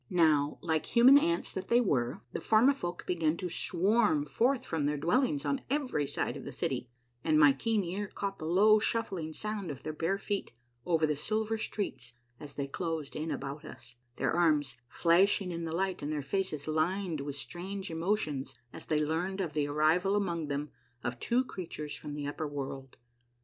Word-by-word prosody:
Now, 155 -4 +3
like 160 -2 0
human 250 +3 +7
ants 170 -8 0
that 190 - -4
they 235 - +5
were, 130 - 0
the - - -2
Formifolk 220 -6 +2
began 165 -2 +1
to 180 -1 -3
swarm 180 -2 +2
forth 250 - +1
from 155 -3 -1
their 150 0 0
dwellings 255 - +1
on 275 -1 0
every 260 - 0
side - - -2
of - - -7
the - - -6
city, 125 - -2 0.3
and 155 -1 +3
my 145 -2 +7
keen 215 +9 0
ear 190 +4 -3
caught 195 0 -4
the 155 - -4
low 210 +5 +6
shuffling 200 -8 -1
sound 210 +1 -3
of 140 -2 -7
their 155 - -4
bare 170 +5 0
feet 200 0 -3 0.4
over 165 -2 +3
the 150 -1 0
silver 215 +8 0
streets 195 - -4 0.3
as 145 -2 -9
they 140 - -2
closed 160 0 -4
in 155 +2 -3
about 140 0 -4
us, 120 -1 -10 0.2
their - - 0
arms 155 -6 +2
flashing 180 +5 +3
in 170 -1 -4
the 160 - -4
light 190 +1 -1
and 145 +1 -3
their 150 -2 -2
faces 155 -1 -2
lined 160 +1 0
with 140 0 -4
strange 185 +6 -5
emotions 160 - -1 0.2
as - - -8
they 155 -1 +2
learned 175 +5 -1
of 170 -6 -2
the 145 -1 0
arrival 160 +7 +2
among 170 -6 -1
them 145 +1 -3 0.3
of 120 0 -3
two 245 +2 +2
creatures 165 - -6
from 145 -1 -6
the 145 -1 -4
upper 150 +2 -3
world. 135 -2 -6
165 Hz, 185 wpm, -31 LUFS, 150-200 Hz, 0.4 s, human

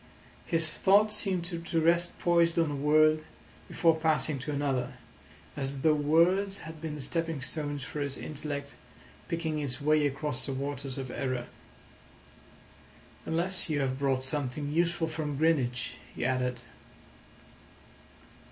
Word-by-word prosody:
His 165 -2 -1
thought 210 +2 +5
seemed 190 -5 0
to 170 -2 -2
rest 170 +2 +2
poised 170 -1 +3
on 165 -3 +2
a - - -2
word 155 +2 +4 0.4
before 165 -2 +3
passing 155 -2 +1
to 145 +4 -4
another, 135 -3 -1 0.6
as 135 -1 -3
though 155 +1 +5
words 170 +7 +3
had 160 -1 -9
been 160 -2 -4
the 150 - -6
stepping 165 +2 -2
stones 145 -1 -3
for 150 - -5
his 140 -1 -1
intellect 145 -1 -4 0.5
picking 160 -2 -2
its 140 -3 -3
way 150 0 +3
across 140 -2 -3
the 135 - -3
waters 140 0 -3
of 130 -2 -5
error. 130 -2 -2 1.8
"Unless 175 +2 0
you 150 -2 +1
have 130 -1 -1
brought 135 -2 +1
something 145 +1 -2
useful 170 +1 +1
from 155 -3 -3
Greenwich," 135 -6 +1 0.2
he - - -2
added. 125 -1 0
150 Hz, 135 wpm, -30 LUFS, 140-165 Hz, 1.8 s, thought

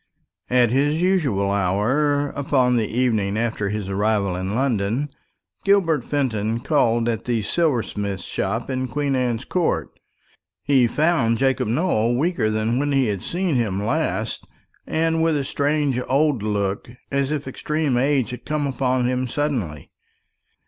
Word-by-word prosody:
At 125 -2 +3
his 145 +4 +2
usual 145 - +1
hour, 130 +10 +1
upon 130 -3 +1
the 110 -3 +1
evening 110 -4 0
after 110 -3 -1
his 105 -1 -3
arrival 100 -1 0
in 95 +3 -3
London, 125 +1 0 0.5
Gilbert 190 -6 +3
Fenton 115 -6 -1
called 120 -5 +2
at 115 -2 -2
the 115 -3 0
silversmith's 105 - -1
shop - - -2
in 130 0 -1
Queen 140 +2 -1
Anne's 125 -1 -1
Court. 180 -2 0 0.7
He 130 -4 +4
found 145 -4 +2
Jacob 135 -3 +1
Nowell 120 -3 +1
weaker 160 -6 +1
than 110 +3 0
when 145 +1 0
he 135 -4 +2
had 100 -3 -2
seen 180 -1 -1
him 100 -4 -1
last, 115 - -1 0.4
and 165 0 +1
with 160 -2 +2
a 140 - -1
strange 145 -2 0
old 140 -2 +2
look, 100 0 -2 0.2
as 140 0 0
if 150 -2 -3
extreme 150 +1 -1
age 130 -2 +1
had 125 - -8
come 150 -1 -1
upon 130 -2 0
him 125 +1 0
suddenly. 115 - -3
125 Hz, 145 wpm, -22 LUFS, 110-145 Hz, 0.7 s, He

